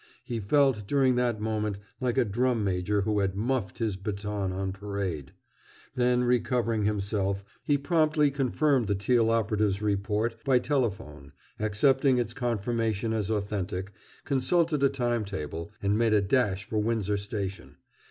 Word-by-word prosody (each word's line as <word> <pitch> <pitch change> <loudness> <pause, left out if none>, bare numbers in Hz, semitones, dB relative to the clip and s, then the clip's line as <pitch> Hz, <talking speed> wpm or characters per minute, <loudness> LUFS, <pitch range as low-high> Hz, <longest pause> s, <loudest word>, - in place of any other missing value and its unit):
He 120 -2 -4
felt, 120 -1 +2
during 135 -1 +3
that 120 -3 +1
moment, 105 -2 -2 0.2
like 125 -1 -1
a 130 - +4
drum 120 +2 0
major 95 +2 0
who 105 +1 0
had 95 -1 0
"muffed" 110 -3 -1
his 110 -5 -1
baton 100 0 -3
on 95 +1 -2
parade. 100 -7 -4 0.6
Then 125 -1 +2
recovering 120 -3 +1
himself, 100 -1 -1 0.2
he 145 - +2
promptly 155 -1 +2
confirmed 135 -2 +1
the 100 - +1
Teal 115 +3 +2
operative's 105 -3 +1
report 105 +2 -1
by 135 -2 +4
telephone, 100 - -2 0.3
accepted 130 +5 +3
its 120 -2 -1
confirmation 115 -3 -1
as 110 -3 -1
authentic, 100 -3 -2 0.3
consulted 150 +3 +1
a 140 - +5
timetable, 100 - -3
and 100 +1 +2
made 115 -2 +3
a 105 - +4
dash 100 -2 +1
for 110 - -2
Windsor 105 -2 0
Station. 100 -1 -5
110 Hz, 145 wpm, -28 LUFS, 100-125 Hz, 0.6 s, a